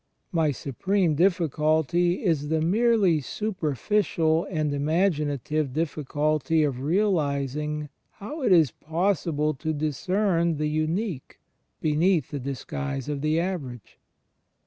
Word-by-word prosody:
My 165 -4 +2
supreme 165 - 0
diffi 175 +1 +3
culty 160 +4 +1
is 160 -6 +1
the 160 0 +1
merely 200 0 +3
superficial 165 - 0
and 155 -5 -1
imaginative 150 -3 0
difficulty 155 0 0
of 140 -4 -1
realizing 150 -4 0 0.2
how 290 +10 -7
it 240 -6 +2
is 160 -8 +5
possible 160 - -1
to 155 +3 -3
discern 170 +3 0
the 150 0 -1
Unique 155 - -2 0.4
beneath 160 0 +2
the 145 - -3
disguise 140 +1 -4
of 145 -2 -3
the 155 +2 +1
Average. 145 - -5
155 Hz, 110 wpm, -26 LUFS, 145-180 Hz, 0.4 s, is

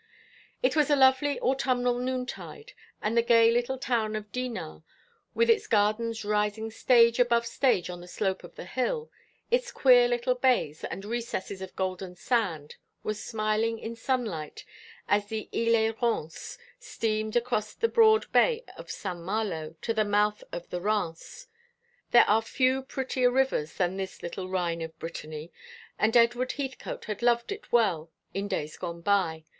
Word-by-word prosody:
It - - +2
was 300 -1 +3
a 290 - +5
lovely 265 +1 +4
autumnal 250 -2 +1
noontide, 260 - -5 0.3
and 215 +2 0
the 235 - +5
gay 230 -1 +5
little 240 +3 0
town 225 -4 -1
of 210 -1 -6
Dinard, 235 -13 -5 0.5
with 465 - +3
its 455 -2 +3
gardens 220 +1 +1
rising 210 +1 0
stage 235 +1 +4
above 235 -1 +3
stage 240 -6 +1
on 175 -1 -7
the 175 - -11
slope 190 0 -2
of 175 - -12
the - - -8
hill, 360 - -2 0.4
its - - +1
queer 245 - +6
little 240 +1 +1
bays 250 - +1
and 195 - -6
recesses 225 -4 -4
of 190 -1 -8
golden 185 -1 -3
sand, 180 - -1 0.3
was 215 0 -3
smiling 220 0 0
in 225 +1 -6
sunlight 225 - -3 0.4
as 205 0 +2
the 220 0 -4
"Isle 230 0 +3
et 225 +1 0
Rance" 195 -10 -2 0.2
steamed 215 - -2
across 235 -3 0
the 460 - +1
broad 440 -2 +5
bay 475 -1 +3
of - - -11
St. 180 -3 -5
Malo 170 -4 -3
to 230 - 0
the 220 -1 +2
mouth 210 0 +1
of 175 - -6
the 180 - -3
Rance. 205 - -3 0.6
There 240 - +6
are 215 +2 +4
few 255 +3 +1
prettier 260 -1 0
rivers 250 - 0
than 180 +1 0
this 190 -1 -6
little 185 +2 -5
Rhine 175 -3 -1
of 160 0 -7
Brittany, 155 -1 -7 0.5
and 225 +3 +4
Edward 240 +2 +3
Heathcote 270 -2 -5
had 210 0 -5
loved 235 +3 +2
it 410 +1 -7
well 185 -9 +2 0.2
in 200 +1 -2
days 155 -5 -3
gone 170 0 -6
by. 170 -5 +1
225 Hz, 160 wpm, -28 LUFS, 190-250 Hz, 0.6 s, queer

